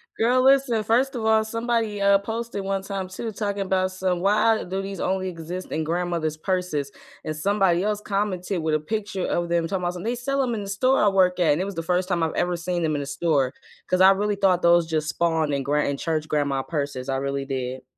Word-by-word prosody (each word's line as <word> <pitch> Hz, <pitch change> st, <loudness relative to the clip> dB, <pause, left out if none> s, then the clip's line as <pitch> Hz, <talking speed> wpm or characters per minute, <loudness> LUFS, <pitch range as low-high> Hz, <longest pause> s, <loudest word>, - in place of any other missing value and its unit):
Girl, 250 Hz, +3 st, +3 dB
listen, 265 Hz, -5 st, +4 dB
first 250 Hz, +5 st, +1 dB
of 225 Hz, -2 st, -3 dB
all, 220 Hz, 0 st, +4 dB
somebody, 230 Hz, -2 st, -1 dB
uh, 200 Hz, 0 st, +4 dB
posted 225 Hz, 0 st, -4 dB
one 195 Hz, 0 st, -2 dB
time 195 Hz, -2 st, -4 dB
too 220 Hz, +4 st, -5 dB
talking 200 Hz, -1 st, -2 dB
about 185 Hz, 0 st, 0 dB
some 185 Hz, -1 st, -1 dB
why 215 Hz, +3 st, +3 dB
do 190 Hz, +2 st, -4 dB
these 195 Hz, -1 st, -5 dB
only 190 Hz, 0 st, -1 dB
exist 175 Hz, +1 st, -6 dB
in 160 Hz, -, -1 dB
grandmothers' 165 Hz, -2 st, -1 dB
purses? 165 Hz, -6 st, -2 dB, 0.3 s
And 155 Hz, -, -3 dB
somebody 190 Hz, +1 st, +2 dB
else 210 Hz, 0 st, 0 dB
commented 195 Hz, -3 st, -2 dB
with 155 Hz, -1 st, +1 dB
a -, -, +1 dB
picture 200 Hz, +2 st, -3 dB
of 175 Hz, 0 st, -1 dB
them 170 Hz, -1 st, +1 dB
talking 190 Hz, 0 st, -2 dB
about 175 Hz, 0 st, -1 dB
something 205 Hz, +7 st, -3 dB
they -, -, -1 dB
sell 275 Hz, +3 st, -1 dB
them 245 Hz, -3 st, 0 dB
in 210 Hz, -, -3 dB
the -, -, -7 dB
store 255 Hz, +5 st, +2 dB
I -, -, +5 dB
work 185 Hz, -2 st, +2 dB
at 160 Hz, -4 st, +4 dB
and 155 Hz, -, -1 dB
it -, -, -1 dB
was 200 Hz, -, -5 dB
the 165 Hz, -, -3 dB
first 180 Hz, +2 st, 0 dB
time 175 Hz, -3 st, 0 dB
I've 160 Hz, -, -1 dB
ever 175 Hz, 0 st, 0 dB
seen 175 Hz, 0 st, -2 dB
them 155 Hz, -1 st, +1 dB
in 145 Hz, -, -1 dB
the 140 Hz, -, -6 dB
store, 140 Hz, -2 st, 0 dB, 0.3 s
'cause 185 Hz, 0 st, +1 dB
I 190 Hz, +1 st, +9 dB
really 205 Hz, +1 st, 0 dB
thought 190 Hz, -3 st, +2 dB
those 170 Hz, -1 st, +5 dB
just 155 Hz, -1 st, -2 dB
spawned 160 Hz, -2 st, 0 dB
in 140 Hz, -1 st, -1 dB
gr 145 Hz, +2 st, 0 dB
in 140 Hz, -1 st, 0 dB
church 155 Hz, -2 st, -2 dB
grandma 140 Hz, -3 st, 0 dB
purses. 140 Hz, -4 st, -4 dB
I 135 Hz, -, 0 dB
really 140 Hz, 0 st, -2 dB
did. 130 Hz, -1 st, -4 dB
185 Hz, 240 wpm, -24 LUFS, 160-205 Hz, 0.3 s, I